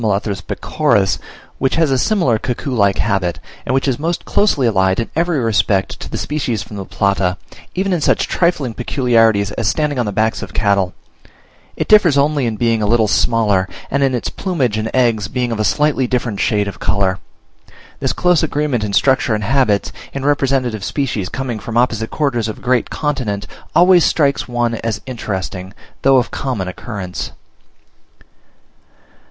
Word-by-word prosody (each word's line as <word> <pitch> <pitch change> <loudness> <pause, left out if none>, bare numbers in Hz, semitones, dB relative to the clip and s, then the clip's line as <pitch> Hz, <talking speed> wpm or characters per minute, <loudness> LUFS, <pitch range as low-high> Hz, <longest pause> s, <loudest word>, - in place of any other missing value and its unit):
pecoris), 95 -1 +1 0.4
which 135 0 +1
has 165 -4 +2
a 135 - +3
similar 130 - +2
cuckoo 125 +3 -3
like 100 -4 +2
habit, 90 -5 0 0.3
and 130 - +1
which 135 - +1
is 130 -1 0
most 165 +3 -2
closely 180 -11 +2
allied 95 -3 +2
in 115 - -3
every 170 0 +1
respect 105 -4 +1
to - - -7
the - - -4
species 125 -8 -2
from 105 - -11
the 100 -1 -5
Plata, 100 -2 0 0.4
even 190 +1 0
in 170 - 0
such - - +2
trifling 155 -9 0
peculiarities 115 -5 +2
as 110 +1 -2
standing 150 +1 0
on 120 - 0
the - - -1
backs 110 +2 0
of 100 -6 -8
cattle; 100 -4 +1 0.8
it - - -2
differs 185 -9 +5
only 140 -2 +2
in 110 - -2
being 115 0 +1
a 105 - +1
little 110 0 +3
smaller, 105 -3 +2 0.2
and 140 - +1
in 135 -2 +2
its 120 - -2
plumage 140 - -1
and 110 +1 -2
eggs 115 -5 +1
being 125 +1 -2
of 115 - -3
a - - +2
slightly 145 +1 +1
different 120 -5 -2
shade 105 -1 +1
of 100 -1 -7
colour. 95 -2 0 0.8
This - - 0
close 180 -2 +2
agreement 145 -6 -1
in 105 -1 -3
structure 130 -1 +3
and 105 - -3
habits, 115 -3 +1 0.2
in 135 0 -4
representative 135 -7 +1
species 125 -10 -2
coming 125 -4 -4
from 115 +2 -4
opposite 115 -2 +1
quarters 125 -7 -1
of 110 - -5
a - - -15
great 125 -1 +1
continent, 125 -10 -2 0.3
always 180 0 +6
strikes 140 -3 +1
one 120 -1 0
as 115 -1 -3
interesting, 95 -6 -5 0.3
though 135 0 +5
of 125 - 0
common 120 -9 -3
occurrence. 95 -1 -6
120 Hz, 170 wpm, -17 LUFS, 105-140 Hz, 0.8 s, always